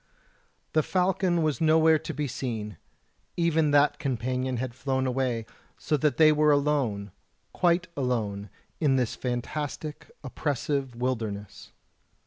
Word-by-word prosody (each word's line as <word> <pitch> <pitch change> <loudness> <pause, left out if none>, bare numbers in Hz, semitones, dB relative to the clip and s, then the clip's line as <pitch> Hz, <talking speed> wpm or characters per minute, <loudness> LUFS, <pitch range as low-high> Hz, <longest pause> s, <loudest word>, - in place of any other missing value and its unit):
The 155 - +4
falcon 180 0 +1
was 155 +1 0
nowhere 160 0 +5
to 160 +2 -6
be 150 -2 -2
seen; 110 - -4 0.6
even 165 -3 +2
that 145 0 +3
companion 130 -1 -2
had 125 0 -3
flown 130 +1 -1
away, 125 -3 -1 0.3
so 155 - 0
that 150 0 +1
they 155 -1 +7
were 150 0 +4
alone 140 -9 +1 0.4
quite 175 0 +2
alone 110 -7 -2 0.3
in 145 -4 +3
this 125 -3 0
fantastic, 145 +4 -4
oppressive 140 -1 -2
wilderness. 110 -5 -4
140 Hz, 120 wpm, -27 LUFS, 125-155 Hz, 0.6 s, they